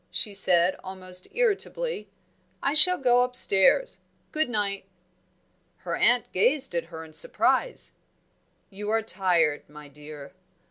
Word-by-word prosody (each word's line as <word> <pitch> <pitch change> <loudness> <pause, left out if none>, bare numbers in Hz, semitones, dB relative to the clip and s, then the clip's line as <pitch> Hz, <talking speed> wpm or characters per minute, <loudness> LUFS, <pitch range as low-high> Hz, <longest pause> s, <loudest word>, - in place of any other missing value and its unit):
she 210 - -1
said, 185 -2 +2
almost 185 -1 -6
irritably. 485 0 -2 0.5
"I 280 - 0
shall 360 +4 +5
go 245 -2 +3
upstairs. 250 - +3 0.3
Good 310 -3 0
night!" 200 -4 -2 0.9
Her 175 -2 -5
aunt 245 0 +2
gazed 260 +6 +1
at 170 -1 -2
her 160 -1 -10
in 155 - -17
surprise. - - -1 0.8
"You 205 +2 -7
are 225 0 0
tired, 175 -9 0
my 150 -1 -13
dear." 145 -1 -12
200 Hz, 125 wpm, -25 LUFS, 170-260 Hz, 0.9 s, shall